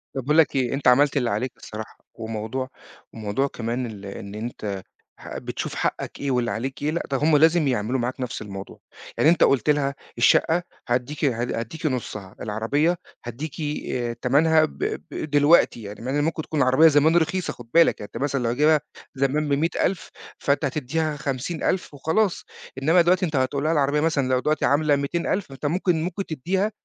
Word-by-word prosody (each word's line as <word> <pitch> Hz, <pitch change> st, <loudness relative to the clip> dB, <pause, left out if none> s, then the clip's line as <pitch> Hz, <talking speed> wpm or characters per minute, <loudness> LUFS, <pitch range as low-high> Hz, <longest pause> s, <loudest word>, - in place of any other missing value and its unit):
طَب 135 Hz, -, -1 dB
باقول 150 Hz, +5 st, +1 dB
لك 155 Hz, -3 st, +4 dB
إيه، 130 Hz, -1 st, +1 dB
أنت 135 Hz, -1 st, -1 dB
عملت 140 Hz, +3 st, +5 dB
اللي 125 Hz, -3 st, +1 dB
عليك 120 Hz, +5 st, -1 dB
الصراحة، 110 Hz, 0 st, -9 dB, 0.2 s
وموضوع 115 Hz, +4 st, -4 dB, 0.4 s
وموضوع 110 Hz, +5 st, -1 dB
كمان 120 Hz, 0 st, -3 dB
ال 105 Hz, -3 st, -8 dB
إن 100 Hz, +1 st, -8 dB
أنت 105 Hz, -4 st, -5 dB, 0.4 s
ه -, -, -7 dB
بتشوف -, -, -5 dB
حقَّك -, -, -3 dB
إيه 140 Hz, -1 st, -1 dB
واللي 120 Hz, -1 st, 0 dB
عليك 130 Hz, +7 st, -4 dB
إيه، 150 Hz, -, 0 dB
لأ 170 Hz, -, -1 dB
ده 135 Hz, -, +2 dB
هم 150 Hz, +2 st, +4 dB
لازم 160 Hz, 0 st, +4 dB
يعملوا 125 Hz, 0 st, 0 dB
معاك 125 Hz, +2 st, -3 dB
نفس 125 Hz, -1 st, -4 dB
الموضوع، 95 Hz, -2 st, -8 dB, 0.4 s
يعني 155 Hz, -, +5 dB
أنت 170 Hz, -, +4 dB
قُلت 135 Hz, +1 st, +3 dB
لها 140 Hz, -2 st, +2 dB, 0.2 s
الشقّة 165 Hz, +8 st, +4 dB, 0.3 s
هاديكِ 125 Hz, +5 st, -1 dB
ه 120 Hz, -4 st, 0 dB
هاديكِ 120 Hz, +6 st, -4 dB
نُصّها، 105 Hz, -8 st, -3 dB
العربية 140 Hz, +11 st, 0 dB, 0.3 s
هاديكِ 135 Hz, +6 st, -6 dB, 0.4 s
آآ، 120 Hz, -2 st, -2 dB
تَمَنها 155 Hz, +6 st, +3 dB
ب -, -, -11 dB, 0.3 s
ب 155 Hz, -, -5 dB
دلوقتي 145 Hz, -4 st, +4 dB
يعني 105 Hz, +2 st, -8 dB
مع 125 Hz, +3 st, -3 dB
إن 145 Hz, +1 st, +1 dB
ممكن 160 Hz, 0 st, -1 dB
تكون 155 Hz, -3 st, -2 dB
العربية 130 Hz, +6 st, +6 dB
زمان 155 Hz, +2 st, +4 dB
رخيصة 175 Hz, +3 st, 0 dB
خُد 120 Hz, -, -13 dB
بالك، 170 Hz, 0 st, +5 dB
يعني 105 Hz, -, -7 dB
أنت -, -, -2 dB
مثلًا 140 Hz, -3 st, -1 dB
لو 115 Hz, -, +1 dB
جايبها 150 Hz, +4 st, +4 dB, 0.4 s
زمان 140 Hz, +3 st, 0 dB
ب100000 165 Hz, +4 st, 0 dB, 0.3 s
فأنت 145 Hz, +2 st, +1 dB
هتدّيها 150 Hz, +3 st, -1 dB
50000 145 Hz, +5 st, -2 dB
وخلاص، 170 Hz, +7 st, 0 dB, 0.4 s
إنمّا 165 Hz, +5 st, +5 dB
دلوقتي 180 Hz, +2 st, +3 dB
أنت 155 Hz, -4 st, -3 dB
هتقول 135 Hz, +2 st, 0 dB
لها 155 Hz, -, +2 dB
العربية 145 Hz, -1 st, +2 dB
مثلًا 150 Hz, -4 st, +1 dB
لو 130 Hz, 0 st, +2 dB
دلوقتي 150 Hz, +3 st, 0 dB
عاملة 145 Hz, 0 st, +3 dB
200000 170 Hz, +5 st, -2 dB
أنت 135 Hz, +2 st, -8 dB
ممكن 170 Hz, +1 st, +1 dB
ممكن 190 Hz, +3 st, -3 dB
تدّيها 190 Hz, +8 st, -1 dB
140 Hz, 185 wpm, -24 LUFS, 120-155 Hz, 0.4 s, العربية